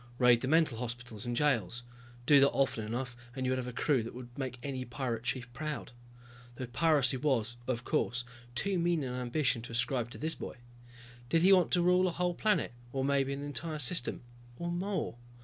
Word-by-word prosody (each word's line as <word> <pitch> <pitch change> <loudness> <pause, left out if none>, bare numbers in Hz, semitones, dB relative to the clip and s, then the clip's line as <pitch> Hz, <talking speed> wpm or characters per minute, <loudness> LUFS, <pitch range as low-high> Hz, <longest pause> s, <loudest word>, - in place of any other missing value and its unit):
Raid 125 -2 +5
the 130 - -1
mental 155 -6 +3
hospitals 120 -2 -5
and 120 - -1
jails. 125 -3 +1 0.4
Do 145 +2 +7
that 140 +1 +6
often 135 -5 0
enough 120 +3 -3 0.2
and 130 -1 -2
you 130 - +1
would 130 - +1
have 125 - -4
a - - -3
crew 130 +2 +2
that 115 +1 -7
would 120 -1 -9
make 130 -2 -4
any 130 -2 -3
pirate 120 -2 -3
chief 125 0 -3
proud. 150 +2 -4 0.6
Though 130 - -4
piracy 135 0 +2
was, 120 -4 0
of 125 -1 -1
course, 120 0 0 0.3
too 195 +7 +2
mean 170 -3 +1
an 125 -2 -3
ambition 125 0 0
to 115 0 -8
ascribe 120 0 0
to - - -10
this 160 +1 0
boy. - - -7 0.7
Did 165 0 +3
he 195 +2 +8
want 180 -3 +5
to 175 - +4
rule 180 +1 +4
a - - 0
whole 180 +1 0
planet 210 - +1 0.2
or 135 0 -1
maybe 140 -1 +2
an 140 +1 -4
entire 150 +3 -3
system? 135 -2 +1 0.3
Or 170 0 -3
more? 180 -6 -2
130 Hz, 200 wpm, -32 LUFS, 120-155 Hz, 0.7 s, he